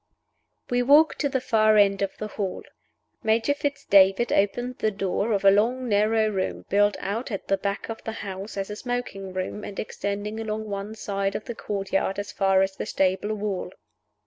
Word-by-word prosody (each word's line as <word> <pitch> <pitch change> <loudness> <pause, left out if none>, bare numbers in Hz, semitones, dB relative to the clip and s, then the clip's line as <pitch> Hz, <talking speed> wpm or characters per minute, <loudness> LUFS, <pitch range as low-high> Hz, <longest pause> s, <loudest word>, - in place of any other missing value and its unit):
We 245 0 +3
walked 290 +5 +5
to 285 - +1
the 265 - 0
far 215 -3 +3
end 200 -1 +4
of 195 -1 -2
the 215 - -4
hall. 195 -3 -4 0.6
Major 225 +5 +2
Fitz 285 -1 -3
David 195 +4 +5
opened 245 +5 0
the 215 - +2
door 200 +2 -1
of 200 -2 0
a 195 - +9
long, 240 +6 +2
narrow 215 +1 +3
room 195 -3 -2
built 205 +1 +3
out 225 +7 -3
at 200 -4 -5
the 195 - +3
back 200 +1 -3
of 225 - -7
the 225 - -4
house 195 +2 -6
as 195 +1 -3
a - - -4
smoking 240 -5 -4
room, 185 +3 -4
and 200 - -7
extending 205 +1 -4
along 220 0 -3
one 200 +1 -5
side 200 -2 -2
of - - -4
the 235 - -5
courtyard 195 -2 -2
as 205 0 -4
far 195 -1 +3
as 190 0 -2
the - - -4
stable 195 +3 0
wall. 200 -3 -3
205 Hz, 195 wpm, -25 LUFS, 195-225 Hz, 0.6 s, a